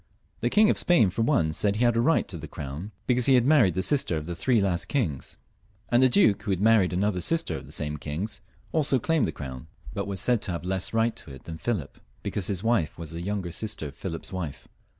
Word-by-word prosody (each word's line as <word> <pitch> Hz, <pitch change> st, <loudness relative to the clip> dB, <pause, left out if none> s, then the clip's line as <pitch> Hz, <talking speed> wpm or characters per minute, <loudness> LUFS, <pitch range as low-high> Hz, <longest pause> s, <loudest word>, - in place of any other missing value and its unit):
The 120 Hz, -, 0 dB
King 215 Hz, -, +5 dB
of -, -, 0 dB
Spain, 140 Hz, -, +4 dB
for 105 Hz, -, -2 dB
one, 115 Hz, -, +2 dB
said 100 Hz, +4 st, +1 dB
he 115 Hz, -, +1 dB
had 120 Hz, -1 st, +3 dB
a 115 Hz, -, +3 dB
right 160 Hz, +6 st, +2 dB
to 95 Hz, -, -6 dB
the 80 Hz, -, -7 dB
crown 75 Hz, +6 st, -6 dB, 0.2 s
because 125 Hz, -1 st, +2 dB
he 135 Hz, -, +6 dB
had 120 Hz, -1 st, +4 dB
married 135 Hz, -, +4 dB
the 95 Hz, -, 0 dB
sister 130 Hz, -, +1 dB
of 75 Hz, -, -5 dB
the 85 Hz, -, -4 dB
three 120 Hz, +7 st, +2 dB
last 95 Hz, -2 st, 0 dB
kings; 95 Hz, -, -2 dB, 0.5 s
and 120 Hz, +2 st, +4 dB
a 130 Hz, -, +6 dB
duke, 110 Hz, -4 st, +4 dB
who 110 Hz, -, -6 dB
had 95 Hz, -2 st, +1 dB
married 105 Hz, -3 st, +4 dB
another 90 Hz, 0 st, 0 dB
sister 165 Hz, -, 0 dB
of -, -, -8 dB
the -, -, -12 dB
same 75 Hz, 0 st, -2 dB
kings, 95 Hz, +9 st, -4 dB, 0.3 s
also 150 Hz, -4 st, +2 dB
claimed 155 Hz, +3 st, +1 dB
the -, -, -2 dB
crown, 65 Hz, -1 st, -8 dB, 0.3 s
but -, -, -3 dB
was 100 Hz, -1 st, -3 dB
said 120 Hz, +3 st, +1 dB
to -, -, -4 dB
have 85 Hz, +1 st, -5 dB
less 95 Hz, 0 st, -1 dB
right 115 Hz, 0 st, +1 dB
to 70 Hz, -, -10 dB
it 65 Hz, -, -11 dB
than 80 Hz, -1 st, -8 dB
Philip, 105 Hz, -, -3 dB, 0.2 s
because 100 Hz, -4 st, -2 dB
his 95 Hz, -2 st, -2 dB
wife 115 Hz, -9 st, +1 dB
was 85 Hz, -1 st, -7 dB
the 85 Hz, 0 st, -5 dB
younger 95 Hz, -1 st, -3 dB
sister 105 Hz, -4 st, -5 dB
of 70 Hz, -, -15 dB
Philip's 85 Hz, 0 st, -6 dB
wife. 85 Hz, -6 st, -5 dB
100 Hz, 250 wpm, -26 LUFS, 85-120 Hz, 0.5 s, he